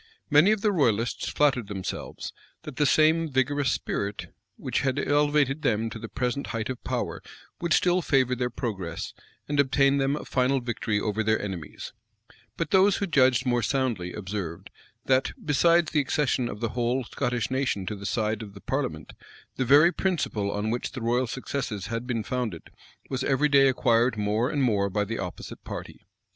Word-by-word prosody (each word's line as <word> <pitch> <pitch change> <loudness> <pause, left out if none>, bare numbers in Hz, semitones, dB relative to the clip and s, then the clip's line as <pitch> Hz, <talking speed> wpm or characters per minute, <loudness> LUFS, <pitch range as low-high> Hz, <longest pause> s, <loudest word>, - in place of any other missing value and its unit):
Many 150 +7 +6
of 215 -2 +1
the 210 - +2
royalists 120 - +1
flattered 130 -7 +2
themselves, 95 -2 -5 0.3
that 150 -4 -9
the 145 - +3
same 160 +2 +4
vigorous 135 +1 +1
spirit 100 +1 -3 0.2
which - - -2
had 130 0 0
elevated 145 0 +2
them 115 -5 0
to 115 - -7
the 115 - -7
present 130 +1 -2
height 115 0 -3
of 125 - -8
power - - -3 0.4
would 170 -1 -3
still 180 +3 +3
favor 130 -4 +2
their 125 0 -1
progress, 100 -9 -4 0.3
and 145 -1 -1
obtain 140 0 +3
them 135 +1 +1
a - - -6
final 130 +1 +1
victory 115 -3 -2
over 105 +1 -1
their 110 0 +2
enemies: 95 -6 -6 0.6
but 165 - -2
those 195 +1 +5
who 200 - -1
judged 130 -8 +3
more 120 -1 +2
soundly, 115 -7 -1
observed, 95 -2 -5 0.3
that, 130 0 +2
besides 165 +3 +3
the 150 - +2
accession 130 -3 0
of 105 - -7
the 115 - 0
whole 125 +3 0
Scottish 120 0 -2
nation 130 -8 -1
to 105 - -3
the 100 0 -6
side 110 0 -1
of 100 -2 -9
the 100 - -11
parliament, 130 - -3 0.4
the 130 - 0
very 145 +7 +6
principle 150 - -1
on 105 +2 -2
which 120 - -3
the 130 - -6
royal 120 +2 +1
successes 120 -5 -4
had 115 +2 -3
been 115 -4 -1
founded, 120 -10 -4 0.4
was 130 -1 -1
every 145 +2 +2
day 140 -1 +6
acquired 120 -2 +2
more 105 +4 0
and 145 -3 0
more 100 -5 +2
by 105 +2 0
the 115 +3 -4
opposite 90 -2 -7
party. - - -8
125 Hz, 180 wpm, -26 LUFS, 110-140 Hz, 0.6 s, Many